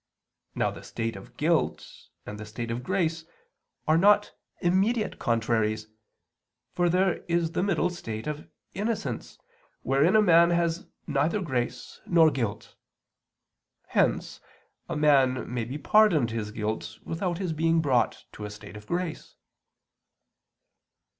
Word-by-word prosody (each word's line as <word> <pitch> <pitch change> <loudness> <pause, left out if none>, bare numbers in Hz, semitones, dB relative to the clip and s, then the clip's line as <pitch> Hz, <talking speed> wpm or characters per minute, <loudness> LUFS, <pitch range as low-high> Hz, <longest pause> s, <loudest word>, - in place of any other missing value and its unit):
Now - - +1
the - - -10
state 115 -1 -4
of 120 +6 -12
guilt 160 +2 +1 0.4
and 105 0 -7
the 110 - -6
state 115 +2 -5
of 120 +2 -3
grace 165 0 -1 0.6
are 155 +1 +4
not 205 +2 +4 0.3
immediate 200 +5 +1
contraries; 110 -2 0 0.8
for 175 -1 +2
there 185 +1 +2
is 170 -1 +1
the - - -1
middle 180 -2 +1
state 110 -11 -6
of 150 0 -5 0.3
innocence 200 - -3 0.5
wherein 140 - +3
a - - +7
man 170 -2 +6
has 170 0 0 0.2
neither 150 +8 +1
grace 130 -9 -3
nor 165 -3 +5
guilt. 110 -6 -3 1.2
Hence - - 0 0.5
a 170 - -2
man 135 -5 +3
may 120 -2 -1
be 130 +5 -5
pardoned 160 - +4
his 110 -2 -3
guilt 110 0 -4
without 175 +1 -2
his 180 -3 -2
being 165 +1 +2
brought 135 -6 +1
to 105 - -8
a - - -5
state 105 0 -11
of 105 0 -11
grace. 175 -2 -4
155 Hz, 135 wpm, -27 LUFS, 115-175 Hz, 1.2 s, a